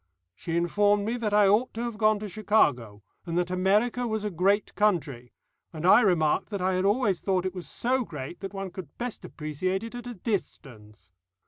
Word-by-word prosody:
She 165 - -4
informed 205 +4 +2
me 230 +3 -1
that 220 -3 -2
I 205 -1 +5
ought 215 +6 +2
to 230 - -3
have 235 -3 -4
gone 215 -1 +4
to 210 - -4
Chicago, 135 - +1 0.2
and 170 -1 -3
that 180 0 0
America 210 +7 +1
was 220 -2 -2
a 210 - -2
great 195 +4 +1
country, 150 - 0 0.4
and 160 0 -6
I 190 +6 +7
remarked 170 -7 +2
that 200 -2 -4
I 185 +1 0
had 185 +1 0
always 205 -3 +1
thought 185 -2 0
it 185 - -2
was 180 -2 -7
so 255 +2 0
great 150 - -8
that 195 0 -6
one 195 -2 -6
could 175 -5 -10
best 245 -1 -5
appreciate 175 +6 -3
it 230 - -7
at 245 0 -7
a 245 - -6
distance. 110 - -6
195 Hz, 205 wpm, -27 LUFS, 170-215 Hz, 0.4 s, I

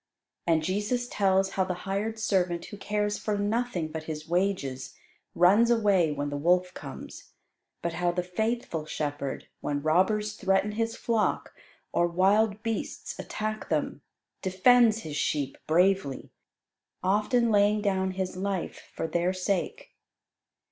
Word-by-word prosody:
And 160 -2 +3
Jesus 210 +7 -1
tells 195 -3 +2
how 190 - +1
the 185 -1 -2
hired 205 +3 -2
servant 180 -5 0
who 205 - -9
cares 210 +1 -1
for 210 -1 -1
nothing 205 -5 -1
but 155 0 -6
his 155 -1 -6
wages, 170 -7 -1 0.4
runs 200 +7 +5
away 200 -8 +3
when 145 0 -3
the 145 - -2
wolf 180 +4 +2
comes; - - -9 0.5
but 170 -1 -1
how 175 +1 +1
the 180 +1 -2
faithful 180 -4 -2
shepherd, 145 -3 -4
when 145 -1 -2
robbers 210 +7 +2
threaten 195 0 +1
his 225 +1 -2
flock, 225 -3 0 0.4
or 175 - +3
wild 200 +4 +2
beasts 225 -1 -4
attack 215 -1 -4
them, 150 -2 -1 0.4
defends 225 +4 +4
his 150 -5 -5
sheep 140 -3 -1
bravely, 180 -3 +2 0.7
often 215 +5 +2
laying 205 0 +4
down 190 -2 0
his 185 -1 -3
life 190 -1 -4
for - - -2
their 175 +3 0
sake. 195 - -2
190 Hz, 135 wpm, -28 LUFS, 170-210 Hz, 0.7 s, runs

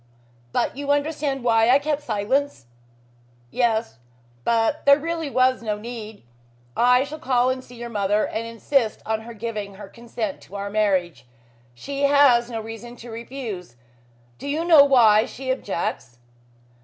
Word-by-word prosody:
But - - -1
you 285 +1 -6
understand 285 -2 0
why 225 -1 +3
I 260 - +7
kept 295 +1 -2
silence?" 240 - -1 0.9
"Yes. 225 - 0 0.4
But 230 - +1
there 280 - +9
was - - -12
really 330 -2 -3
no 255 -5 +1
need. 220 - -8 0.5
I 250 +2 +4
shall 305 +3 -8
call 255 -2 +2
and 260 0 -4
see 245 - -14
your 240 0 -7
mother 205 0 +1
and 230 +1 -4
insist 230 0 -1
on 220 0 -1
her 230 +1 -10
giving 210 -3 -5
her 195 - -10
consent 230 -2 -6
to 200 - -13
our 200 0 -4
marriage. 190 -9 0 0.5
She 280 - -2
has 275 -4 +5
no 230 -2 -4
reason 225 +2 -8
to 240 -1 -11
refuse. 225 - -7 0.6
Do - - -7
you 310 +4 -1
know 320 -5 +8
why 230 -6 +5
she 260 0 -4
objects?" 170 - -4
235 Hz, 155 wpm, -23 LUFS, 215-275 Hz, 0.9 s, there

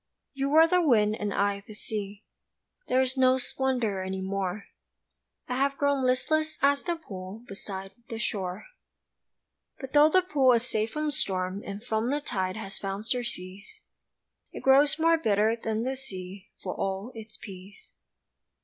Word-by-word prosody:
You 275 0 -1
were 320 +3 +7
the 360 +2 +3
wind 215 -9 +4
and 205 -1 -2
I 200 0 +1
the 215 - -10
sea 205 -1 -5 0.6
There 255 +1 +3
is 260 +1 0
no 260 0 +5
splendor 245 -6 0
any 190 0 -3
more, 195 +1 -3 0.8
I 250 - -2
have 275 +1 +1
grown 285 -2 +2
listless 310 +5 +1
as 280 0 +4
the 345 -1 -1
pool 195 - -9
Beside 195 -1 -7 0.2
the 225 - -4
shore. 190 -4 -3 1.1
But 265 -2 -8
tho' 295 +1 +7
the 370 +3 +4
pool 275 -8 +4
is 235 +1 +1
safe 215 -1 -1
from 305 +2 -2
storm 190 -8 -1
And 200 +2 -7
from 225 0 0
the 290 +2 +1
tide 190 -8 -2
has 195 -3 -7
found 195 +2 -4
surcease, 210 -6 -3 0.7
It - - -8
grows 275 +3 +6
more 330 0 +4
bitter 215 -4 +2
than 225 -1 -2
the 260 +2 -1
sea, 195 -7 -9
For 185 - -3
all 195 +5 -3
its 220 -1 -9
peace. 195 0 -11
225 Hz, 160 wpm, -28 LUFS, 195-270 Hz, 1.1 s, were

